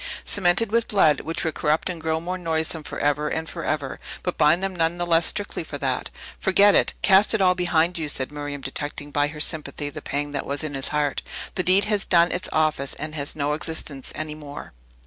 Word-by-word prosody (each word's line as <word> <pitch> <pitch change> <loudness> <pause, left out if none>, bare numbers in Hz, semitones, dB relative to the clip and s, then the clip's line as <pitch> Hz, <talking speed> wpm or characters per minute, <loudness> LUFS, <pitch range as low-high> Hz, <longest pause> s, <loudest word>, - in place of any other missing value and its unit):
Cemented 195 +3 +2
with 230 0 +2
blood, 155 -8 +3
which 165 - -4
would 160 - -1
corrupt 155 +1 0
and 175 -3 -4
grow 160 0 0
more 180 +3 -4
noisome 160 -2 -2
forever 145 0 -1
and 160 0 -3
forever, 155 -5 -3 0.2
but 180 - -2
bind 155 +5 +3
them 195 -1 -2
none 165 0 +1
the 175 - -1
less 165 -1 +4
strictly 205 -4 -1
for 150 -2 -6
that. 130 -3 -1 0.3
"Forget 200 +2 +5
it! - - +3
Cast 200 +2 +5
it - - 0
all 185 -1 +5
behind 175 -1 +1
you!" 155 -2 -2
said 135 -1 -1
Miriam, 145 -1 -5
detecting, 145 +2 -4
by 145 0 +2
her 150 +1 -8
sympathy, 150 -2 -2
the 155 - -8
pang 145 +1 -3
that 145 - -3
was 140 +2 -2
in 155 -2 -4
his 135 -1 -1
heart. 150 -1 0 0.3
"The - - 0
deed 185 +3 +4
has 210 -2 +1
done 170 -1 +4
its 180 - -1
office, 155 -3 +1
and 155 0 -6
has 145 -1 -2
no 145 0 0
existence 155 -3 -2
any 155 -1 -4
more." 145 - -9
160 Hz, 215 wpm, -24 LUFS, 145-175 Hz, 0.3 s, Forget